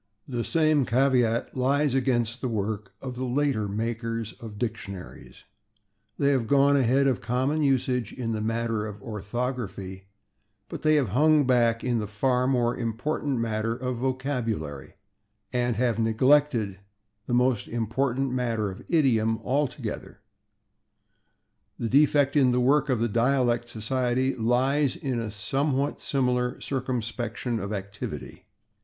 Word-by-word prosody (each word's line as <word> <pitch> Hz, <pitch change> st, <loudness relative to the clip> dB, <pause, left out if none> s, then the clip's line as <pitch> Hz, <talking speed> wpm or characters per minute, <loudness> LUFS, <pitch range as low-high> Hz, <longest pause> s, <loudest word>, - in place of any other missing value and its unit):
The 120 Hz, -3 st, -2 dB
same 155 Hz, -1 st, +2 dB
caveat 125 Hz, -2 st, +1 dB
lies 140 Hz, +2 st, +2 dB
against 125 Hz, -2 st, 0 dB
the 130 Hz, -, -1 dB
work 105 Hz, -2 st, -3 dB
of 130 Hz, -2 st, -4 dB
the 125 Hz, +1 st, -5 dB
later 130 Hz, -4 st, 0 dB
makers 115 Hz, +1 st, -3 dB
of 110 Hz, -3 st, -9 dB
dictionaries; 100 Hz, -, -6 dB, 0.7 s
they 140 Hz, -, +2 dB
have 130 Hz, -5 st, +1 dB
gone 140 Hz, +1 st, +4 dB
ahead 135 Hz, +1 st, +3 dB
of 130 Hz, -3 st, +1 dB
common 130 Hz, +6 st, 0 dB
usage 130 Hz, -5 st, +1 dB
in 120 Hz, -3 st, -4 dB
the 110 Hz, -1 st, -2 dB
matter 115 Hz, -1 st, -1 dB
of 105 Hz, -1 st, -9 dB
orthography, 105 Hz, -4 st, -4 dB, 0.6 s
but -, -, -6 dB
they 155 Hz, 0 st, +4 dB
have 140 Hz, -8 st, +2 dB
hung 150 Hz, +6 st, +4 dB
back 120 Hz, -2 st, +2 dB
in 120 Hz, -2 st, +1 dB
the 105 Hz, -, -3 dB
far 125 Hz, +5 st, +1 dB
more 125 Hz, -2 st, +1 dB
important 125 Hz, +4 st, -2 dB
matter 115 Hz, 0 st, -1 dB
of 125 Hz, 0 st, -3 dB
vocabulary, 120 Hz, -, -3 dB, 0.6 s
and 120 Hz, -1 st, +1 dB
have 115 Hz, -1 st, +1 dB
neglected 115 Hz, -3 st, +2 dB, 0.5 s
the 120 Hz, -, +1 dB
most 125 Hz, -3 st, +2 dB
important 125 Hz, +3 st, -1 dB
matter 115 Hz, -5 st, -1 dB
of 95 Hz, -, -10 dB
idiom 115 Hz, -9 st, +3 dB
altogether. 125 Hz, -6 st, -3 dB, 1.6 s
The 115 Hz, -, -2 dB
defect 145 Hz, +1 st, +4 dB
in 135 Hz, -4 st, +5 dB
the 125 Hz, -, +2 dB
work 145 Hz, +4 st, +3 dB
of 125 Hz, -4 st, +1 dB
the 120 Hz, -, +2 dB
Dialect 120 Hz, +1 st, +1 dB
Society 125 Hz, +3 st, 0 dB
lies 130 Hz, +4 st, +1 dB
in 130 Hz, -4 st, -2 dB
a 115 Hz, -1 st, -3 dB
somewhat 135 Hz, +7 st, -1 dB
similar 125 Hz, -2 st, 0 dB
circumscription 120 Hz, -2 st, -3 dB
of 100 Hz, +1 st, -4 dB
activity. 100 Hz, -1 st, -6 dB
125 Hz, 135 wpm, -26 LUFS, 110-135 Hz, 1.6 s, in